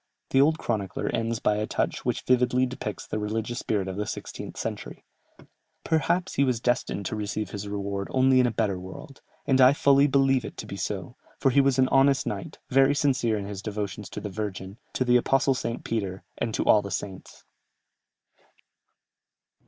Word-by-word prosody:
The 135 - +5
old 155 +3 +4
chronicler 105 - -2
ends 115 0 -1
by 105 -1 +1
a 105 0 -1
touch - - -2
which - - -1
vividly 125 0 +3
depicts 125 -5 -5
the 110 - -3
religious 110 +3 -3
spirit 100 -3 -1
of 95 0 -5
the 105 - -2
sixteenth - - -7
century: - - -6 0.8
"Perhaps 175 +3 +1
he 140 - +2
was 125 -4 +1
destined 120 -4 -1
to 110 - -2
receive 105 -1 -3
his 100 0 -5
reward 100 -1 -3
only 130 0 +4
in 125 - +4
a - - 0
better 105 -4 -1
world, 95 +9 -10 0.2
and 135 -2 +3
I 130 +2 +8
fully 140 0 +4
believe 135 -2 +3
it - - -8
to - - -6
be - - -7
so; - - -4 0.2
for 135 - +2
he 140 +2 +5
was 135 -1 +2
an 130 -1 +4
honest 135 0 +4
knight, 100 -2 -5
very 135 +2 +5
sincere 130 -6 +1
in 100 - -4
his 100 -1 -6
devotions 105 0 -5
to - - -6
the 105 - -6
Virgin, 100 0 -5
to 130 - 0
the 125 0 +5
Apostle 135 +2 +2
St. 115 -2 -4
Peter, 100 -4 -3
and 115 - -2
to - - -1
all 105 - +6
the 100 - -7
saints." 95 -2 -6
115 Hz, 190 wpm, -26 LUFS, 105-135 Hz, 0.8 s, I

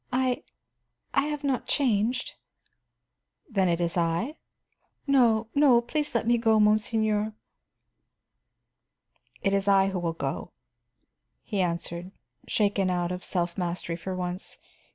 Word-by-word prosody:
"I 255 0 +1 0.7
I 275 +1 +2
have 295 -1 -4
not 270 -3 -1
changed." 245 -2 +1 1.1
"Then 195 - +1
it 170 0 +1
is 170 -1 0
I?" 175 - 0 0.7
"No, 240 -6 +4
no; 280 -4 +6
please 295 +4 -2
let 230 - +1
me 235 0 +3
go, 225 -1 +3
monseigneur." 215 0 +2 2.1
"It 195 - +2
is 195 0 +1
I 195 -1 +5
who 190 -1 -2
will 170 -1 -1
go," 165 - -4 0.9
he 205 -3 -1
answered, 170 0 -3 0.4
shaken 200 -3 +1
out 175 -1 0
of 180 0 -5
self 175 0 -1
mastery 175 -1 -2
for 185 +2 -5
once. 180 +1 -4
205 Hz, 125 wpm, -27 LUFS, 180-240 Hz, 2.1 s, no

